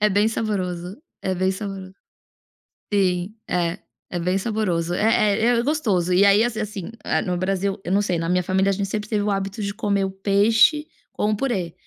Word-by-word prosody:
é 210 Hz, -, +4 dB
bem 205 Hz, +2 st, +2 dB
saboroso, 190 Hz, -4 st, -2 dB, 0.3 s
é 190 Hz, -1 st, -1 dB
bem 185 Hz, +1 st, +1 dB
saboroso. 190 Hz, -1 st, -6 dB, 1.0 s
Sim, 185 Hz, 0 st, +1 dB, 0.2 s
é. 175 Hz, +1 st, 0 dB, 0.3 s
É 175 Hz, -, -1 dB
bem 180 Hz, +3 st, 0 dB
saboroso, 185 Hz, -6 st, -1 dB
é 215 Hz, +1 st, +2 dB
é 225 Hz, -, +2 dB
é 240 Hz, -1 st, +3 dB
gostoso. 215 Hz, -, 0 dB
E 195 Hz, +3 st, +5 dB
aí, 200 Hz, +2 st, +5 dB
assim 240 Hz, -2 st, -1 dB
assim, 210 Hz, -1 st, -5 dB
eh, -, -, +1 dB
no 180 Hz, -1 st, -2 dB
Brasil, 195 Hz, +1 st, -1 dB
eu 185 Hz, -, -3 dB
não 205 Hz, -, +4 dB
sei, 185 Hz, -4 st, 0 dB
na 165 Hz, -, -2 dB
minha 180 Hz, 0 st, +1 dB
família 190 Hz, +2 st, +1 dB
a -, -, +2 dB
gente 195 Hz, 0 st, -2 dB
sempre 210 Hz, +1 st, -3 dB
teve 210 Hz, -2 st, 0 dB
o 205 Hz, -, 0 dB
hábito 195 Hz, +2 st, -3 dB
de 200 Hz, 0 st, -2 dB
comer 200 Hz, -2 st, 0 dB
o 190 Hz, -, -2 dB
peixe 210 Hz, +9 st, +3 dB, 0.3 s
com 210 Hz, -, 0 dB
o -, -, +1 dB
purê. 195 Hz, -11 st, -2 dB
195 Hz, 205 wpm, -23 LUFS, 185-210 Hz, 1.0 s, E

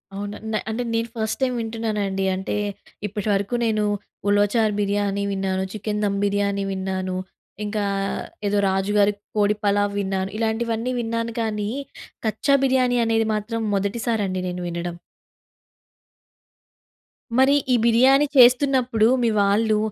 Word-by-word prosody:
అవునా! 205 Hz, +1 st, -5 dB
న్ -, -, -4 dB, 0.2 s
అంటే 225 Hz, +3 st, -2 dB
నేను 230 Hz, +1 st, -1 dB
ఫస్ట్ 220 Hz, -1 st, -2 dB
టైమ్ 255 Hz, -1 st, +1 dB
వింటున్నానండి. 215 Hz, -4 st, -2 dB
అంటే, 190 Hz, +2 st, -3 dB, 0.5 s
ఇప్పటివరకు 205 Hz, +1 st, -1 dB
నేను 215 Hz, -2 st, +1 dB, 0.4 s
'ఉలవచార్ 205 Hz, +1 st, +3 dB
బిర్యానీ' 200 Hz, 0 st, 0 dB
విన్నాను, 190 Hz, -1 st, -1 dB
చికెన్ 210 Hz, 0 st, -3 dB
దమ్ 200 Hz, -1 st, 0 dB
బిర్యానీ 200 Hz, 0 st, 0 dB
విన్నాను, 190 Hz, -1 st, -3 dB, 0.5 s
ఇంకా 210 Hz, 0 st, -2 dB, 0.6 s
ఏదో 205 Hz, 0 st, +1 dB
'రాజుగారి 200 Hz, +2 st, +2 dB, 0.2 s
కోడి 210 Hz, 0 st, +3 dB
పలావ్' 205 Hz, 0 st, +1 dB
విన్నాను 190 Hz, -1 st, -1 dB
ఇలాంటివన్నీ 230 Hz, +2 st, -1 dB
విన్నాను 230 Hz, 0 st, -2 dB
కానీ 210 Hz, -2 st, -2 dB, 0.6 s
కచ్చా 280 Hz, +6 st, +2 dB
బిర్యానీ, 255 Hz, -2 st, +2 dB
అనేది 225 Hz, -1 st, +1 dB
మాత్రం 225 Hz, +2 st, -3 dB
మొదటిసారి 210 Hz, +2 st, -1 dB
అండి 185 Hz, -1 st, -2 dB
నేను 180 Hz, 0 st, -4 dB
వినడం. 170 Hz, 0 st, -4 dB, 2.4 s
మరి, 270 Hz, +2 st, +5 dB, 0.2 s
ఈ -, -, +6 dB
బిర్యానీ 265 Hz, +5 st, +5 dB
చేస్తున్నప్పుడు 250 Hz, -3 st, +5 dB, 0.2 s
మీ 230 Hz, -, +3 dB
వాళ్ళు 210 Hz, +2 st, +2 dB
210 Hz, 120 wpm, -23 LUFS, 200-230 Hz, 2.4 s, ఈ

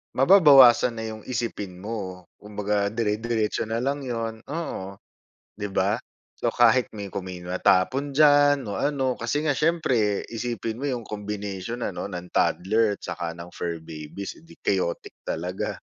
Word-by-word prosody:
mababawasan 135 Hz, -7 st, +7 dB
na 110 Hz, -, -4 dB
'yung 110 Hz, -, -7 dB
isipin 105 Hz, -7 st, -3 dB
mo, 95 Hz, -5 st, -5 dB, 0.2 s
kumbaga 105 Hz, -1 st, -1 dB
dire-diretso 110 Hz, 0 st, -1 dB
na 115 Hz, +1 st, -1 dB
lang 140 Hz, +1 st, -1 dB
yun, 115 Hz, -2 st, -3 dB
oo. 135 Hz, -, -5 dB, 0.6 s
Di 105 Hz, 0 st, -4 dB
ba, -, -, +1 dB, 0.4 s
so -, -, 0 dB
kahit 120 Hz, 0 st, +4 dB
may 100 Hz, -1 st, -5 dB
kumil 90 Hz, -2 st, -6 dB
matapon 95 Hz, +10 st, +2 dB
diyan 145 Hz, -2 st, +5 dB
o 100 Hz, -, -3 dB
ano 135 Hz, -3 st, 0 dB
kasi 130 Hz, +7 st, -1 dB
nga 145 Hz, -, +3 dB
siyempre 130 Hz, -11 st, +1 dB
isipin 115 Hz, -1 st, -3 dB
mo 145 Hz, -, -2 dB
'yung 120 Hz, -4 st, -3 dB
combination 105 Hz, +1 st, -5 dB
ano -, -, -4 dB
ng 90 Hz, -1 st, -7 dB
toddler 105 Hz, +2 st, +2 dB
at -, -, -55 dB
saka 85 Hz, -1 st, -4 dB
ng 85 Hz, +1 st, -9 dB
fur 85 Hz, -1 st, -3 dB
babies, 80 Hz, +4 st, -7 dB
eh, -, -, -21 dB
di 165 Hz, -, -15 dB
chaotic -, -, -1 dB
talaga. -, -, -3 dB
115 Hz, 150 wpm, -25 LUFS, 100-135 Hz, 0.6 s, mababawasan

